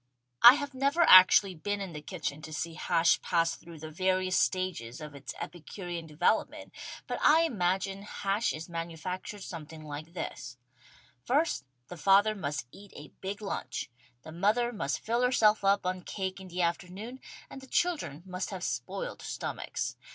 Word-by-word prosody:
I 240 +2 +11
have 285 -1 -4
never 280 +5 +1
actually 185 - +8
been 205 +5 -3
in 190 -3 -5
the 150 - -6
kitchen 155 -3 -5
to 155 - -9
see 165 +2 -3
hash 165 0 +2
pass 165 -1 +1
through 165 -1 -12
the 155 +1 -8
various 185 +2 +1
stages 170 -10 0
of 150 -1 -8
its 140 -1 -8
epicurean 175 0 -6
develop 165 +8 +2
ment, - - -11 0.3
but - - -4
I 315 +2 +6
imagine 195 - 0
hash 200 +1 -1
is 155 +2 -6
manufactured 170 +4 -5
something 160 -3 -8
like 155 +2 -8
this: 130 -6 -6 0.7
First 285 - +1 0.2
the 175 - -9
father 200 +5 +5
must 145 - -4
eat 200 0 -14
a 145 -1 -11
big 200 +3 -5
lunch, 195 -10 -4 0.3
the 155 - -9
mother 215 +8 +1
must 140 -9 -2
fill 235 +2 +1
herself 220 -5 +4
up 195 -1 +3
on 185 0 -1
cake 190 +1 -4
in 190 - -10
the 180 0 -2
afternoon 190 +8 -3 0.3
and 270 - -10
the 265 - -13
children 290 - -1
must 185 0 -4
have 185 -3 -6
spoiled - - -4
stomachs. - - -4
185 Hz, 165 wpm, -30 LUFS, 165-205 Hz, 0.7 s, I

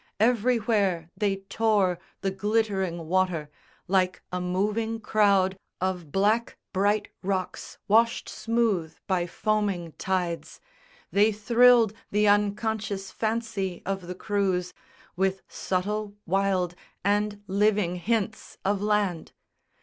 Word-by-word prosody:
Everywhere 215 -7 +2
they 195 -2 0
tore 205 -6 +2 0.2
The 195 - 0
glittering 190 -4 -1
water. 175 -4 0 0.4
Like 185 -1 +1
a 180 0 -2
moving 210 +5 -1
crowd 200 -3 +2 0.2
Of 180 -5 -2
black 215 +6 +1 0.2
bright 205 +2 +1
rocks 190 -1 -3
washed 230 +3 +3
smooth 215 -7 0
by 180 -2 0
foaming 200 -3 -1
tides, 180 -3 -2 0.5
They 210 +2 +4
thrilled 230 +1 +5 0.2
the 210 +1 +2
unconscious 205 -1 0
fancy 220 -5 -2
of 195 -2 -3
the 180 - -5
crews 185 -3 -1 0.4
With 190 +1 0
subtle, 205 +2 -2
wild, 190 -1 +1 0.3
and 205 0 +1
living 200 -2 +1
hints 220 +3 -2
of 200 0 +1
land. 205 -5 0
200 Hz, 105 wpm, -27 LUFS, 185-215 Hz, 0.5 s, thrilled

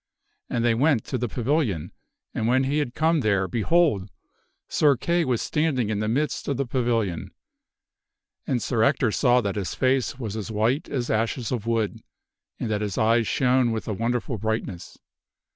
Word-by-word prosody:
And 120 -1 0
they 120 - +4
went 130 0 +2
to 130 - -3
the 120 - -1
pavilion, 115 - -1 0.4
and 110 - -1
when 130 +2 +3
he 140 +3 0
had 130 -5 -3
come 160 +1 +2
there, 100 -6 +1
behold! 115 - +1 0.6
Sir 145 -4 +3
Kay 170 +6 +1
was 125 -4 0
standing 140 -8 0
in 105 - -1
the 105 - -1
midst 140 +7 -1
of 140 - -1
the 140 - 0
pavilion. 115 -8 -1 1.2
And 120 -3 0
Sir 115 -4 0
Ector 130 -2 +3
saw 125 +1 +3
that 100 -2 -3
his 95 -5 -3
face 130 -1 +1
was 110 -5 -5
as 110 0 -5
white 115 +7 0
as 125 -4 -2
ashes 115 +1 -1
of 115 -3 -3
wood 115 -3 0 0.6
and - - -2
that 105 -1 0
his 105 -2 -3
eyes 115 0 +3
shone 125 -2 +2
with 110 -1 -4
a 110 - -1
wonderful 115 +2 -2
brightness. 110 -4 -4
120 Hz, 175 wpm, -25 LUFS, 110-130 Hz, 1.2 s, they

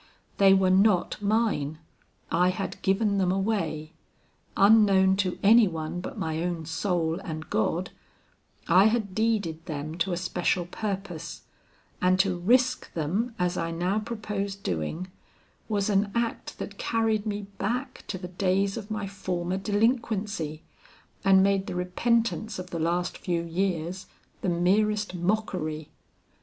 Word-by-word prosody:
They 195 -1 +7
were 190 -1 +3
not 195 0 +3
mine. 205 -9 0 0.5
I 180 +2 +3
had 185 +1 -4
given 200 +1 +2
them 185 -1 +2
away. 175 -6 -1 0.6
Unknown 195 -2 +6
to 190 -2 0
any 220 +2 +7
one 165 0 -4
but 265 +6 -7
my 160 -5 -2
own 170 -2 -2
soul 165 0 -1
and 160 -5 -6
God, 165 +12 0 0.8
I 185 +4 +6
had 220 -3 +1
deeded 205 -7 0
them 155 +1 -5
to 185 +3 +1
a 175 - -1
special 180 0 0
purpose, 195 -3 -5 0.6
and 185 0 +4
to 190 -1 +3
risk 250 +7 +2
them 195 +10 -1
as 180 -1 0
I 165 - -1
now 180 +5 0
proposed 210 -3 -4
doing, 90 - -3 0.6
was 205 -2 0
an 200 0 +2
act 235 -1 -2
that - - -7
carried 225 -2 0
me 205 0 -2 0.2
back 245 +7 -3
to 190 - -3
the 180 -1 -7
days 195 +2 0
of 215 -2 -7
my 215 -2 -3
former 185 -2 -3
delinquency, 205 - -1 0.6
and 190 -1 +6
made 195 0 +2
the - - -4
repentance 225 +5 0
of 180 -1 -7
the 170 - -3
last 175 +2 -1
few 170 -2 -1
years 175 +1 -2 0.3
the 190 - 0
merest 205 +4 +1
mockery. 175 -5 -2
190 Hz, 140 wpm, -27 LUFS, 175-210 Hz, 0.8 s, They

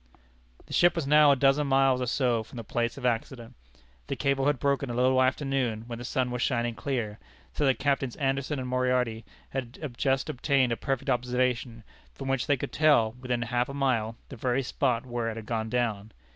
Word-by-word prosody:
The - - -10
ship 175 0 +4
was 165 -4 -1
now 150 +1 +6
a - - +5
dozen 135 +2 +3
miles 135 -1 +3
or 125 - -1
so 120 -2 +1
from 110 - -12
the 115 - -5
place 120 +2 -2
of 130 - -6
accident. 120 0 -2 0.5
The - - -2
cable 140 0 +1
had 145 -2 +2
broken 140 -1 0
a 120 - -3
little 130 +1 +3
after 130 +3 +1
noon, 125 -5 -1
when 120 -1 -7
the - - -6
sun 125 0 -1
was 125 -1 -3
shining 120 -3 0
clear, 115 -5 -3 0.3
so 145 - +1
that 135 - +3
Captains 135 -3 0
Anderson 135 +1 -1
and 130 -1 -4
Moriarty 125 -3 0 0.3
had 130 +1 -5
just 135 +2 0
obtained 130 -1 +1
a - - +1
perfect 135 +1 -2
observation, 125 -1 -1 0.3
from 135 -1 -6
which 135 +1 0
they 145 -2 +3
could - - -5
tell, 145 -8 +4
within 125 0 -3
half 120 +2 -1
a 140 - -6
mile, 115 -5 0
the 135 - -9
very 125 +3 0
spot 125 -1 0
where 120 -2 -2
it 110 - -5
had 115 -1 -7
gone 110 0 -2
down. 110 -4 -1
125 Hz, 210 wpm, -28 LUFS, 120-135 Hz, 0.5 s, now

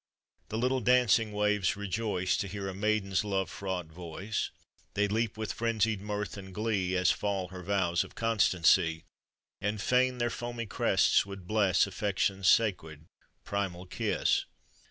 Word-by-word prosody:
The 110 - -3
little 130 +3 +1
dancing 120 -2 +4
waves 105 -2 +1
rejoice 100 -2 -1
To 100 - -2
hear 100 0 -5
a 95 - -4
maiden's 100 -1 0
love 95 -4 -1
fraught 95 -3 -4
voice; 90 +5 -4 0.5
They 105 +1 +2
leap 110 +1 -1
with 110 -1 -3
frenzied 110 -3 0
mirth 105 0 -4
and 95 -2 -10
glee, 100 -4 0
As 90 - +4
fall 100 -3 -2
her 90 0 -8
vows 90 -2 +1
of - - -14
constancy. 90 -7 +3 0.6
And 105 +1 -1
fain 125 +4 +2
their 120 -1 0
foamy 120 -1 -4
crests 100 - +3
would 100 -2 -8
bless, 100 -3 +3
Affection's 95 -1 -1
sacred, 80 -8 +1 0.4
primal 95 -3 -3
kiss. 90 - 0
100 Hz, 145 wpm, -30 LUFS, 95-110 Hz, 0.6 s, dancing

